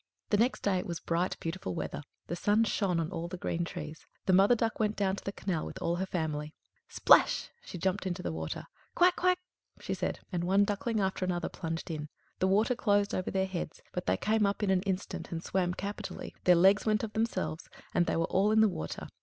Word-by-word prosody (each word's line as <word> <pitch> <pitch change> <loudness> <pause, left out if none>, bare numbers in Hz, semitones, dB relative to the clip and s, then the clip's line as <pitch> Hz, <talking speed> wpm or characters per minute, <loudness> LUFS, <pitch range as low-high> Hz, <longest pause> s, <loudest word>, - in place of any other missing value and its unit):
The 205 - +4
next 240 +5 +2
day 190 -2 +2
it - - -5
was 170 -2 -3
bright, 170 +2 -1
beautiful 170 +2 -4
weather; 165 - -4 0.2
the 170 - -3
sun 210 +5 +3
shone 195 -5 +1
on 165 -1 -2
all 165 +1 -3
the 185 +1 -6
green 175 0 -2
trees. 160 -3 -6 0.2
The 190 - +3
Mother 195 +6 +6
Duck 225 -1 -1
went 215 -1 +1
down 195 -2 +1
to - - -8
the 195 - -3
canal 185 -5 -2
with - - -7
all 170 +1 0
her 190 +1 -2
family. 155 -4 -3 0.3
Splash! - - +4
she - - -7
jumped 190 +3 -1
into 180 0 -3
the - - -2
water. 80 0 -4 0.3
"Quack! 360 0 +5
quack!" 365 0 +3 0.4
she - - -3
said, - - -2
and 175 -2 -1
one 195 +3 +4
duckling 210 +2 -1
after 190 -1 0
another 180 -2 -1
plunged 165 -1 -4
in. 150 -1 -5 0.3
The 185 - +3
water 210 +6 +3
closed 205 -4 +2
over 185 - -1
their 190 0 +1
heads, 175 -4 -5
but 180 - -4
they - - +3
came 220 +1 +1
up 200 +1 -2
in 195 - +2
an 185 -1 +3
instant, 190 0 -3
and 165 0 -4
swam 180 -1 0
capitally; 200 +2 -5
their 180 - +7
legs 190 +4 +5
went 215 -1 +1
of 215 -1 -4
themselves, 220 -7 -2 0.2
and 175 - +2
they - - +1
were 165 - +2
all 195 +4 +2
in 220 0 +5
the 220 - +6
water. 80 - -5
190 Hz, 230 wpm, -31 LUFS, 170-205 Hz, 0.4 s, their